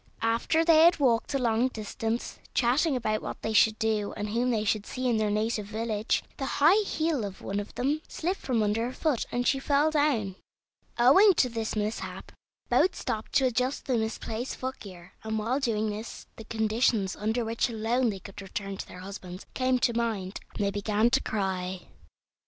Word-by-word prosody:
After 230 +8 +2
they 325 -2 +6
had 345 +1 +5
walked 245 -5 +2
a - - +4
long 235 -1 +2
distance, 225 0 -4 0.2
chatting 265 +5 +3
about 215 -3 -1
what - - -6
they 220 - -1
should 220 0 +5
do 215 -2 0
and 210 0 -3
whom 240 +4 0
they 220 -3 +1
should 210 0 0
see 255 0 -3
in 235 -2 +2
their 215 -1 +1
native 215 0 -1
village, 220 0 -1
the 270 - -3
high 340 +9 +6
heel 315 - -1
of 195 -2 -7
one 200 +1 -2
of 205 - -7
them 285 +5 0
slipped 365 +4 -2
from 240 -5 0
under 215 +3 0
her 255 - -6
foot, 295 -6 -1
and 245 0 -1
she 270 - +2
fell 285 +3 +2
down. 255 -11 +1 0.6
Owing 355 - +7
to 250 - +3
this 225 -2 -3
mishap 215 +1 -4 0.4
both 370 - +3
stopped 220 0 -4
to 275 -2 +4
adjust 255 +2 0
the 255 - +1
misplaced 225 +2 -3
footgear, 195 -9 -8
and 220 0 -2
while 230 +6 0
doing 220 -5 0
this 215 +2 -7
the 225 - -10
conditions 220 -2 +1
under 220 +3 -1
which 230 +3 0
alone 230 +2 +1
they 200 - -3
could 195 +2 -10
return 195 0 -5
to - - -6
their 180 - -10
husbands 185 -1 -8
came 255 0 +2
to 240 -1 +1
mind, 220 -5 -2 0.2
and 205 - -1
they 200 - +1
began 210 +3 +1
to - - +3
cry. 190 -3 -2
225 Hz, 190 wpm, -28 LUFS, 210-255 Hz, 0.6 s, Owing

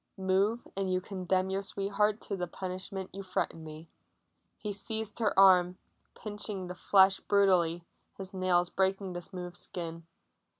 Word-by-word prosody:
"Move 195 +5 +1
and 195 -1 -1
you 185 - +2
condemn 185 0 -1
your 195 +1 0
sweetheart 200 +2 0
to 200 - -4
the 180 -2 -3
punishment 185 +1 -6
you 195 - -6
threaten 185 -3 -3
me." 155 +1 -10 0.7
He 210 -1 -4
seized 220 +2 -1
her 220 -4 +1
arm, 185 -2 +6 0.4
pinching 210 -2 -2
the 180 - -6
flesh 190 +1 +4
brutally, 180 -4 +2 0.3
his 195 0 -5
nails 180 -2 +1
breaking 190 0 0
the 175 - -5
smooth 180 0 -7
skin. 165 -2 -7
190 Hz, 145 wpm, -31 LUFS, 180-200 Hz, 0.7 s, arm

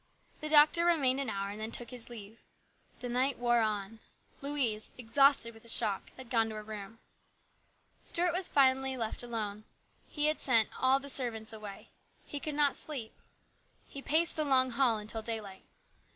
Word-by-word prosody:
The 305 - -4
doctor 305 +2 +6
remained 280 -7 +2
an 275 -4 -1
hour 200 -1 -3
and 210 - -8
then 220 - -3
took 235 +1 0
his 245 -2 -4
leave. 220 -1 -11 0.6
The 250 - -4
night 255 +2 0
wore 240 0 +2
on. 215 0 -3 0.4
Louise, 270 -7 -2
exhausted 250 0 +3
with 225 - -16
the 230 - -10
shock, 210 -4 +2
had 260 -2 -11
gone 225 -2 +2
to 220 - -7
her 215 - -7
room. 210 0 -9 1.0
Stuart 345 0 +1
was 365 +1 -1
finally 265 -1 +2
left 225 -2 -3
alone. 215 -3 -5 0.4
He 300 0 +1
sent 230 -5 +3
all 260 +1 +3
the 280 - -9
servants 235 -5 0
away. 210 -2 -10 0.4
He 290 - -6
could 300 0 -5
not 290 -2 +2
sleep. 260 -8 -3 0.7
He 275 - -9
paced 320 +4 +2
the 310 - +1
long 260 -3 +3
hall 240 -2 +2
until 215 +1 -4
daylight. 215 -4 -6
240 Hz, 170 wpm, -31 LUFS, 220-275 Hz, 1.0 s, doctor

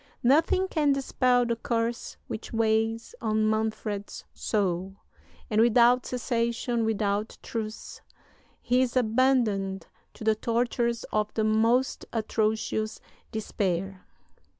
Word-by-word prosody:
Nothing 320 +8 +3
can 300 -6 +2
dispel 255 -2 +2
the 235 0 0
curse 230 0 -2
which 220 - -7
weighs 225 0 0
on 215 -1 +1
Manfred's 215 -2 -2
soul; 190 -2 -1 0.5
and 215 -1 +2
without 240 +2 +4
cessation, 235 -1 -1
without 210 -1 -1
truce, 220 -1 -6 0.6
he 250 +1 +3
is 255 0 0
abandoned 220 -6 +1 0.3
to - - -9
the 220 0 +4
tortures 235 +1 -1
of 215 0 0
the 220 - +1
most 225 +4 +2
atrocious 220 0 -1 0.3
despair. 195 -3 -2
225 Hz, 105 wpm, -27 LUFS, 215-240 Hz, 0.6 s, without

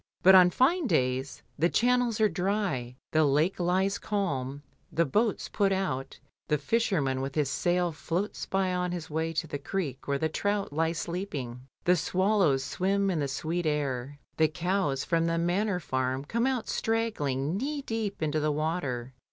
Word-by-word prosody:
But 190 +2 +8
on 180 -1 +8
fine 285 - +2
days 130 - 0 0.2
the 170 +3 +4
channels 245 0 +2
are 215 - +5
dry, 180 - -1 0.2
the 155 0 +4
lake 150 +7 +2
lies 185 +3 +1
calm, 145 -9 -2 0.3
the 170 - +2
boats 215 - 0
put 200 -1 +1
out, 185 -9 -2 0.3
the 150 - +2
fisherman 145 - 0
with 135 0 -4
his 145 -3 +1
sail 175 +3 +1
floats 170 +6 -3
by 190 -1 0
on 180 0 -1
his 170 -3 -6
way 160 +1 -1
to 165 +1 -1
the 145 -2 -5
creek 145 -4 -4
where 140 0 +1
the 160 - 0
trout 205 +2 -1
lie 165 +2 +1
sleeping, 145 -8 -5 0.2
the 180 - +4
swallows 185 -5 +2
swim 195 +6 0
in 170 - -1
the 145 - 0
sweet 160 +5 -2
air, 145 -2 -2 0.2
the 160 - +5
cows 170 -3 -1
from 165 -1 +1
the 165 0 0
Manor 180 +3 +1
Farm 130 -3 -2
come 235 - 0
out 255 -4 -1
straggling 165 - -1
knee 280 +6 -2
deep 220 -8 -3
into 155 0 0
the 150 0 +1
water. 145 -5 -2
170 Hz, 170 wpm, -28 LUFS, 145-195 Hz, 0.3 s, But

